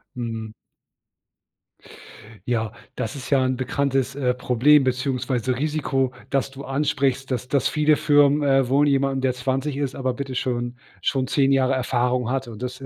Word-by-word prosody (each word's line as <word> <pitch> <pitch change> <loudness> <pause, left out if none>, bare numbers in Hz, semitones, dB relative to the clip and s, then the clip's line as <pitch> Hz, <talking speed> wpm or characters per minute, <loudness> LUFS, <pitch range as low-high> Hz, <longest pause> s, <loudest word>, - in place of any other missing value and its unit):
Mhm. 115 -2 -5 2.0
Ja, 115 -3 -1 0.2
das 110 - -4
ist 135 - -8
ja 135 -2 +3
'n 130 0 0
bekanntes, 135 0 -1
äh, 125 -3 0
Problem 125 +4 +4
beziehungsweise 130 -1 -1
Risiko, 140 -3 0 0.2
das 135 0 0
du 135 +1 -10
ansprichst, 135 -1 0
dass 125 -1 -3
das 140 0 +1
viele 150 0 +3
Firmen, 145 0 +4
äh, 135 -2 +3
wohl 140 +3 +3
jemandem, 135 -1 +1
der 130 -1 0
20 135 +3 -2
ist, 140 -2 -2
aber 130 -1 -2
bitte 135 0 -5
schon 120 -1 -2 0.3
schon 135 -2 0
10 135 +1 +2
Jahre 135 -1 +3
Erfahrung 125 -1 0
hat 135 -1 -2
und 115 +1 -9
das 125 +1 -5
130 Hz, 160 wpm, -23 LUFS, 125-140 Hz, 2.0 s, Problem